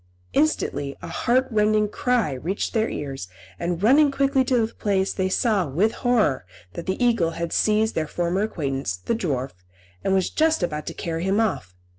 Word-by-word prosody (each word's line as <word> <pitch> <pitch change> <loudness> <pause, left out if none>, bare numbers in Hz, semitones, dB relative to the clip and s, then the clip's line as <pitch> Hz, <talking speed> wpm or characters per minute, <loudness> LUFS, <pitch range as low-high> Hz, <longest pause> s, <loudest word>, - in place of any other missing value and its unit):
Instantly 145 - 0
a - - -5
heart 255 +2 +1
rending 215 -1 +3
cry 240 - 0
reached 170 +10 -3
their 225 0 +1
ears, 135 -9 -5 0.3
and, 175 +1 -2
running 285 +6 +6
quickly 275 -1 +2
to 245 -3 +2
the 225 - -9
place, 195 -2 0
they 190 -1 -1
saw, 205 -4 +1
with 180 +11 +1
horror, 225 - +1 0.3
that 170 - -7
the 190 - -1
eagle 225 -9 +2
had 170 -1 -3
seized 215 +1 +2
their 155 -1 -1
former 175 +4 -1
acquaintance, 135 - -2
the 90 - -2
dwarf, 140 - -2 0.5
and 195 - +2
was 190 -1 +1
just 315 - +2
about 150 -3 -3
to - - -5
carry 165 0 -3
him 195 +3 +1
off. 140 - -1
195 Hz, 180 wpm, -24 LUFS, 160-230 Hz, 0.5 s, running